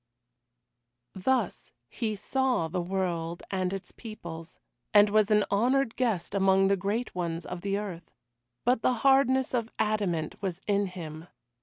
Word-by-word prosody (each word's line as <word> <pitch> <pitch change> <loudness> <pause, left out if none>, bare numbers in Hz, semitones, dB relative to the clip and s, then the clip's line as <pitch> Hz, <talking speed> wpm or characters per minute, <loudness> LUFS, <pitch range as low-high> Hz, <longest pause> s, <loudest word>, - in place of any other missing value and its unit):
Thus 220 +2 -1
he 220 - -3
saw 250 -3 0
the 180 +2 -2
world 175 -2 -2
and 185 -1 0
its 195 0 -6
peoples, 170 -7 -9 0.4
and 205 0 +7
was 215 0 +4
an 210 -1 +4
honoured 245 +4 +2
guest 225 -9 -1
among 195 -1 +4
the 200 - +4
great 205 +6 -2
ones 170 -2 -3
of 180 -1 -6
the 200 +1 -1
earth. 185 -5 -6 0.6
But 245 -1 +3
the 255 - +3
hardness 265 -1 +4
of 230 -2 0
adamant 195 -8 -1
was 185 -4 -3
in 200 -1 +1
him. 165 -3 -8
200 Hz, 145 wpm, -28 LUFS, 175-225 Hz, 0.6 s, and